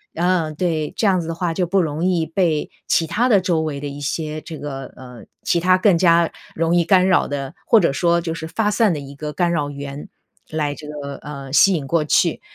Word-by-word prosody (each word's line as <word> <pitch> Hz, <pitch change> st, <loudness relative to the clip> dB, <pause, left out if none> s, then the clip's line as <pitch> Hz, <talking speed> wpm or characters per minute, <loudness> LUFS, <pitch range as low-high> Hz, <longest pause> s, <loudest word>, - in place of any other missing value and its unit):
嗯， 170 Hz, -2 st, 0 dB
对， 160 Hz, -3 st, -1 dB
这 -, -, 0 dB
样 185 Hz, -3 st, +3 dB
子 160 Hz, -, -7 dB
的 165 Hz, -, -3 dB
话， 170 Hz, -1 st, -2 dB
就 180 Hz, +1 st, -1 dB
不 195 Hz, +2 st, +2 dB
容 155 Hz, 0 st, -2 dB
易 180 Hz, -3 st, +1 dB
被 160 Hz, -2 st, 0 dB, 0.2 s
其 165 Hz, -, +2 dB
它 215 Hz, +10 st, 0 dB
的 210 Hz, -5 st, +5 dB
周 175 Hz, -3 st, +1 dB
围 150 Hz, -3 st, -3 dB
的 145 Hz, -, -5 dB
一 140 Hz, +1 st, -7 dB
些 155 Hz, +2 st, -3 dB
这 160 Hz, 0 st, -8 dB
个 135 Hz, -3 st, -6 dB
呃， 125 Hz, -4 st, -12 dB, 0.2 s
其 170 Hz, -, +1 dB
它 185 Hz, +2 st, +4 dB
更 185 Hz, -1 st, +4 dB
加 170 Hz, -1 st, +4 dB, 0.2 s
容 165 Hz, +1 st, +1 dB
易 175 Hz, -, +4 dB
干 185 Hz, 0 st, +4 dB
扰 185 Hz, -2 st, +3 dB
的， 140 Hz, -1 st, -4 dB
或 225 Hz, -, +6 dB
者 170 Hz, -8 st, +1 dB
说 170 Hz, +3 st, +2 dB
就 165 Hz, -1 st, -3 dB
是 160 Hz, -1 st, -6 dB
发 210 Hz, +5 st, 0 dB
散 215 Hz, -3 st, +3 dB
的 150 Hz, -, -3 dB
一 140 Hz, 0 st, -9 dB
个 150 Hz, +1 st, -6 dB
干 175 Hz, +2 st, 0 dB
扰 150 Hz, -4 st, -1 dB
源 140 Hz, 0 st, -7 dB, 0.4 s
来 150 Hz, -2 st, -1 dB
这 150 Hz, 0 st, -11 dB
个， 140 Hz, -2 st, -6 dB
呃， 140 Hz, -2 st, -8 dB
吸 195 Hz, +6 st, +6 dB
引 150 Hz, -5 st, -2 dB
过 165 Hz, +2 st, +1 dB
去， 150 Hz, -, +2 dB
165 Hz, 255 characters per minute, -20 LUFS, 145-175 Hz, 0.4 s, 或